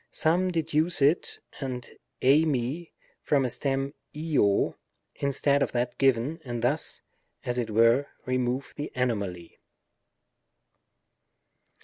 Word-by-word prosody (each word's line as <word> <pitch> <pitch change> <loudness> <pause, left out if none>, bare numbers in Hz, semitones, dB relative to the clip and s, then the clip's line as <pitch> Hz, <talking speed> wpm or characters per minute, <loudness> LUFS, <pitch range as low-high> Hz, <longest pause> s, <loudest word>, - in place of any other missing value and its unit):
Some 175 +4 +2
deduce 160 -1 0
it 145 +5 +2 0.2
and 130 -3 -4 0.4
ei 140 +5 +6
/Ac 150 +3 -1 0.3
from 140 -3 +2
a 125 - -2
stem 135 +1 -1 0.2
{no) 150 -11 +2 0.4
instead 140 0 +1
of - - 0
that 120 0 -1
given, 135 +4 +2
and 120 -3 -4
thus, 140 +6 -1 0.4
as 125 0 -1
it 120 - -2
were, 115 +6 +4 0.2
remove 130 +1 -1
the 145 - -4
anomaly. 100 -9 -2
135 Hz, 110 wpm, -27 LUFS, 120-150 Hz, 0.4 s, ei